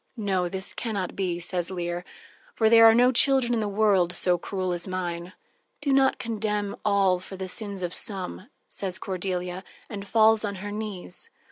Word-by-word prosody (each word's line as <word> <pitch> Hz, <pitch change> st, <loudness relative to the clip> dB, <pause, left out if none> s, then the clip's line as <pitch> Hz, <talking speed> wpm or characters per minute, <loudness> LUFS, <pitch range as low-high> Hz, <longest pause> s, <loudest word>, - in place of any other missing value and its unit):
"No, 190 Hz, -4 st, 0 dB
this 190 Hz, +1 st, -4 dB
can 225 Hz, -3 st, -4 dB
not 185 Hz, -3 st, -3 dB
be," 180 Hz, -3 st, -1 dB
says 175 Hz, 0 st, 0 dB
Leir, 175 Hz, -1 st, -3 dB, 0.5 s
"for 220 Hz, -1 st, +3 dB
there 225 Hz, 0 st, +9 dB
are 225 Hz, -, +7 dB
no 245 Hz, +2 st, +5 dB
children 260 Hz, -1 st, +3 dB
in 230 Hz, -, +1 dB
the 215 Hz, -, -1 dB
world 200 Hz, -4 st, +2 dB
so 180 Hz, 0 st, +2 dB
cruel 185 Hz, +1 st, -3 dB
as 175 Hz, +1 st, -2 dB
mine." 175 Hz, -1 st, -4 dB, 0.5 s
"Do 285 Hz, -2 st, 0 dB
not 270 Hz, 0 st, +4 dB
condemn 210 Hz, -3 st, -2 dB
all 195 Hz, -3 st, +3 dB
for 185 Hz, +1 st, -10 dB
the 190 Hz, 0 st, -5 dB
sins 200 Hz, -1 st, -2 dB
of 175 Hz, 0 st, -3 dB
some," 195 Hz, 0 st, -5 dB, 0.2 s
says 185 Hz, -2 st, -4 dB
Cordelia, 185 Hz, -2 st, -3 dB, 0.3 s
and 200 Hz, -1 st, -6 dB
falls 220 Hz, 0 st, +4 dB
on 200 Hz, -1 st, -2 dB
her 205 Hz, +2 st, -6 dB
knees. 210 Hz, -, -6 dB
195 Hz, 180 wpm, -26 LUFS, 180-220 Hz, 0.5 s, there